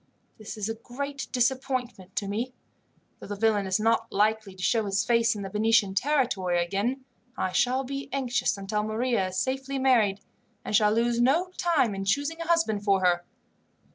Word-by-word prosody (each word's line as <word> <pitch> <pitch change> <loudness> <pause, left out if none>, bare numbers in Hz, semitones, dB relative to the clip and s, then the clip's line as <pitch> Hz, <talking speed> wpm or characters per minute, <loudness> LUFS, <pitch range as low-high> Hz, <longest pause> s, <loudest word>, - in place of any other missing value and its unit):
"This 215 +1 -8
is 210 -1 -2
a 225 - -2
great 275 +5 -6
disappointment 250 -6 -1
to 200 - -2
me. 235 +5 -3 0.6
Though - - -10
the 205 - -4
villain 205 -1 +1
is 190 +2 +1
not 225 +1 +1
likely 215 -1 0
to 185 - -8
show 225 +1 +2
his 200 +1 0
face 230 -1 +3
in 205 - -5
the 195 - -5
Venetian 210 -2 +3
territory 205 -8 +1
again, 235 +9 -2 0.3
I 185 - -1
shall 255 +5 +1
be 275 +1 -5
anxious 265 -4 0
until 200 +2 -2
Maria 215 -1 0
is 185 0 -6
safely 270 +1 -2
married, 235 -7 +3 0.5
and - - -1
shall 210 -1 +4
lose 235 +2 +1
no 325 +9 +2
time 310 -11 +2
in 195 0 -4
choosing 285 +10 0
a 335 - -5
husband 330 -12 +1
for 195 -2 +2
her. 175 -1 +2
225 Hz, 180 wpm, -27 LUFS, 200-260 Hz, 0.6 s, shall